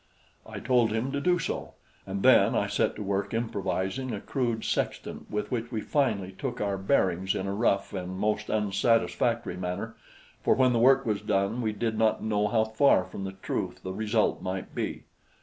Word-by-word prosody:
I - - -7
told 120 -2 +2
him 115 +5 -1
to 140 0 -2
do 180 +3 +3
so; 165 - -4 0.3
and 95 0 -3
then - - +6
I - - +2
set - - 0
to 105 - -5
work 100 +2 -1
improvising 110 +2 -2
a 105 - -3
crude 120 -4 -2
sextant - - -3
with 105 0 -3
which 120 -1 -2
we 110 -3 -2
finally 105 -11 0
took 125 +6 -5
our 100 -1 0
bearings 95 -3 +1
in 95 - -2
a 100 - -2
rough 100 -2 +1
and 95 -1 -4
most 105 +1 -1
unsatisfactory 110 +1 +1
manner; 90 +5 -4 0.5
for - - +3
when 130 -1 +4
the 115 - +2
work 135 +3 +5
was 105 -3 0
done, 100 +5 0
we 110 -2 0
did 110 +1 -2
not 110 -1 +2
know 105 -1 +1
how 110 +1 +2
far 110 -1 +3
from 95 +1 -7
the 95 - -5
truth 90 0 -3
the 95 - -4
result 110 +2 +1
might 95 0 -4
be. - - -3
105 Hz, 190 wpm, -28 LUFS, 95-120 Hz, 0.5 s, then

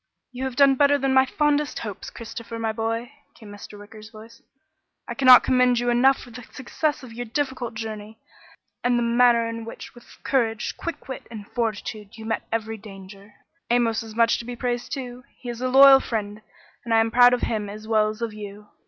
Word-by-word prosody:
"You 255 +1 -5
have 260 -2 -4
done 275 0 +5
better 285 +1 +3
than 270 -1 0
my 265 0 +4
fondest 295 0 0
hopes, 210 -4 -6
Christopher, 230 0 -8
my 225 -1 -1
boy," 225 +2 -3 0.2
came 215 -3 -13
Mr. 205 0 -11
Wicker's 215 +1 -13
voice. 225 +1 -15 0.7
"I 235 - -4
cannot 255 -1 +7
commend 250 -1 +3
you 240 0 0
enough 260 +3 +4
for 245 - -13
the 240 +2 -9
success 285 +5 -3
of 240 -3 -11
your 240 +1 -6
difficult 255 -2 -3
journey, 220 -1 -7 0.7
and 245 0 +2
the 240 - 0
manner 235 0 +3
in 230 0 -6
which 230 - -10
with 240 - -17
courage, 225 -5 -1
quick 335 -4 -7
wit, 260 - -8
and 215 -3 -9
fortitude 220 -2 -4
you 220 - -9
met 225 0 -3
every 225 0 -3
danger. 195 0 -13 0.3
Amos 235 -2 +1
is 220 -1 -10
much 230 0 +3
to 235 - -8
be 245 0 -6
praised 245 0 -3
too. 250 -2 -6
He 245 - -9
is 240 0 -6
a 255 - 0
loyal 270 +1 +8
friend 210 -4 -4 0.4
and 230 -1 0
I - - +5
am 225 0 +1
proud 245 +1 +6
of 245 - -7
him 210 -3 -2
as 215 +1 -9
well 215 -1 +2
as 215 +2 -6
of 225 -2 -3
you." 210 0 -10
230 Hz, 205 wpm, -23 LUFS, 220-250 Hz, 0.7 s, loyal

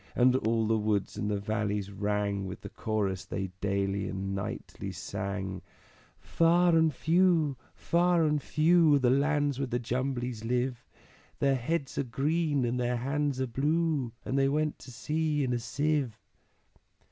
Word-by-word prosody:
And 125 +1 +4
all 115 -3 +1
the 110 0 +2
woods 105 -2 -1
and 105 - -2
the 105 -1 0
valleys 105 -1 -2
rang 100 -1 -1
With 95 - -7
the - - -8
Chorus 100 -4 -2
they 95 -2 -4
daily 100 0 0
and 95 0 -3
nightly 100 -1 -5
sang, 95 +1 -4 0.6
"_Far 170 +1 +4
and 160 -1 +4
few, 165 -1 +2 0.2
far 175 0 +2
and 150 -1 +1
few, 160 +1 +4
Are - - +5
the 125 -3 +3
lands 145 0 +1
where 140 - -1
the 120 0 -1
Jumblies 125 -1 -2
live; 125 +1 -1 0.5
Their 140 -1 +2
heads 135 +3 -2
are - - +2
green, 145 +2 0
and 120 +1 -1
their 125 0 0
hands 140 +2 -1
are 130 - +1
blue, 145 +1 0
And 135 - 0
they 135 0 +3
went 150 +1 0
to 130 - -11
sea 150 +3 -1
in 125 -2 0
a 120 - 0
sieve. 135 0 -1
125 Hz, 160 wpm, -29 LUFS, 105-150 Hz, 0.6 s, Are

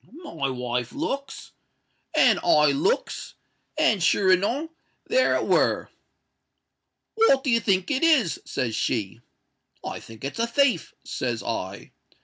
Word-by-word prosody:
My 150 - -3
wife 125 -1 -3
looks—and 280 -2 -2
I 150 -1 +4
looks—and 310 - -2
sure 190 +3 +3
enow 240 - +1 0.3
there - - +2
it - - -1
were.—'What 355 -13 -2
do 265 - 0
you 230 - +4
think 190 -1 0
it 265 - 0
is?' 290 - +3
says 120 -5 -3
she.—'I 115 0 -6
think 115 +2 -14
it's 140 +10 -5
a 230 - +1
thief,' 250 - +1
says 120 -3 -3
I. 100 -4 -5
190 Hz, 115 wpm, -25 LUFS, -, 0.3 s, I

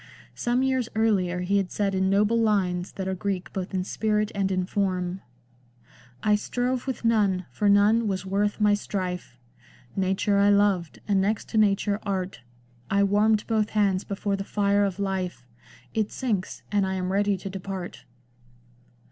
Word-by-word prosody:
Some 245 +2 0
years 260 -3 0
earlier 190 -5 +1
he 195 +3 +1
had 195 -2 0
said 200 -2 -1
in 190 0 +1
noble 210 +4 +3
lines 185 -4 0
that 190 -1 -4
are 190 - -1
Greek 190 0 -3
both 190 -1 -4
in 185 -2 -1
spirit 215 +2 0
and 195 -1 0
in 185 -1 0
form: 185 -2 -1 0.3
— 120 -1 -33
" 125 0 -26
I 210 - +3
strove 245 +4 -1
with 260 -3 -4
none, 200 -5 +2
for 205 +11 +1
none 210 +3 +4
was 190 -2 -2
worth 200 +2 0
my 210 -1 +4
strife; 185 -8 -3 0.6
Nature 195 +1 +1
I 200 0 +5
loved, 200 -5 +2
and 200 -2 +3
next 210 +2 -1
to - - -2
Nature, 205 0 +2
Art; 190 -5 -3 0.5
I 200 +1 +3
wanned 210 +2 +3
both 215 -2 +1
hands 195 -2 +2
before 200 0 -2
the 195 - -4
fire 200 0 +2
of 195 -2 -3
life; 190 -8 -3 0.5
It 215 -2 0
sinks, 215 -8 -3
and 205 -1 +2
I 190 0 -1
am 185 0 -2
ready 200 0 +2
to 190 - -8
depart." 190 -1 -6
200 Hz, 175 wpm, -26 LUFS, 185-210 Hz, 0.6 s, I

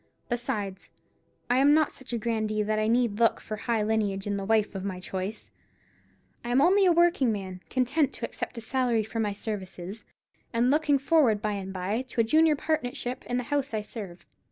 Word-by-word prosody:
Besides, 235 -6 -3 0.6
I 245 +2 +3
am 285 +2 +6
not 310 -1 +3
such 260 -1 -11
a 240 - 0
grandee 215 -2 -1
that 215 +1 0
I 215 - +1
need 235 -2 +1
look 230 -1 +3
for 215 - -6
high 225 0 -1
lineage 210 -3 0
in 205 -1 -1
the 195 -1 -3
wife 215 0 +2
of 195 -1 -5
my 190 -2 -4
choice. 190 +3 -5 0.9
I 240 - -5
am 245 +2 +3
only 375 +6 +5
a - - +6
working 340 -7 +4
man, 190 -3 -5
content 265 +3 +1
to 230 - -4
accept 235 - -6
a - - -4
salary 240 -1 +1
for 225 +2 -5
my 210 -2 0
services; 200 -1 -6 0.5
and 240 +2 +3
looking 300 -1 +3
forward 275 -6 +3
by 215 0 -1
and 195 -1 -5
by 190 +5 -2
to 250 -2 -7
a - - +6
junior 310 +6 +4
partnership 255 -4 -2
in 245 - -1
the 250 - -1
house 280 -4 0
I 215 - 0
serve. 200 -5 -9
230 Hz, 205 wpm, -27 LUFS, 205-260 Hz, 0.9 s, am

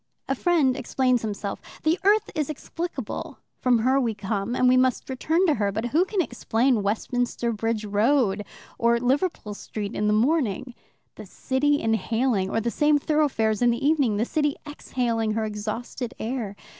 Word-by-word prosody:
A - - +1
friend 290 -3 +2
explains 255 -3 +1
himself: 205 -2 -4 0.2
the 320 +3 +2
earth 415 +2 +3
is 305 -4 -2
explicable 310 -1 -5 0.2
from 250 -2 +3
her 260 +4 +2
we 230 -4 -1
came, 205 +3 -2
and 255 - +3
we 250 - +5
must 255 0 +2
return 320 +8 +1
to 320 - +4
her. 205 -5 0
But 220 +4 -3
who 340 +4 +4
can 385 -2 0
explain 240 -2 +1
Westminster 235 +3 -1
Bridge 225 0 -2
Road 210 0 +2 0.4
or 235 0 +3
Liverpool 255 - 0
Street 205 +1 -6
in 210 - 0
the - - +3
morning 250 - +1 0.4
the - - -9
city 290 +2 0
inhaling 225 -2 0
or 225 - 0
the 235 +1 -1
same 295 +2 +3
thoroughfares 275 -8 +1
in 245 - +5
the 235 +4 -1
evening 280 -9 +2
the 220 - +1
city 295 +1 0
exhaling 235 -6 -2
her 220 0 -1
exhausted 220 +4 -5
air? 225 -3 -4
245 Hz, 170 wpm, -25 LUFS, 220-285 Hz, 0.4 s, we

